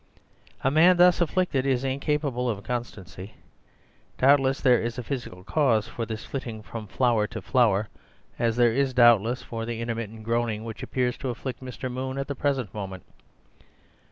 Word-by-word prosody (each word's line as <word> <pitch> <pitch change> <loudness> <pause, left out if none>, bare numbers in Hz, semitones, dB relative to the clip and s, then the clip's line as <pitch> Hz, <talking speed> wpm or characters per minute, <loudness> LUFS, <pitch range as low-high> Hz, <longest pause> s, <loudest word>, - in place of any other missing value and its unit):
A 135 - +2
man 175 +4 +6
thus 180 0 +5
afflicted 170 -5 +1
is 130 -2 +1
incapable 135 -2 -1
of 100 -3 -3
constancy. 110 -5 -6 0.8
Doubtless 135 0 +4
there 125 -4 +4
is 120 +1 -3
a 125 - -4
physical 115 -9 -6
cause 115 -5 +2
for 115 -2 -5
this 110 0 -6
flitting 115 -5 -6
from 110 0 -7
flower 115 -1 +1
to 115 0 -6
flower— 110 -6 +2 0.5
as 115 -1 +1
there 120 -2 +4
is, 135 0 0
doubtless, 120 0 +5
for 115 -1 -5
the 115 0 -4
intermittent 115 -2 -4
groaning 115 -1 -1
which 115 +2 -7
appears 125 -1 -1
to 130 - -4
afflict 125 +2 -5
Mr. 130 0 -6
Moon 130 +1 -4
at 135 - -3
the 140 - -2
present 135 -7 -1
moment. 95 -3 -6
120 Hz, 165 wpm, -26 LUFS, 115-135 Hz, 0.8 s, man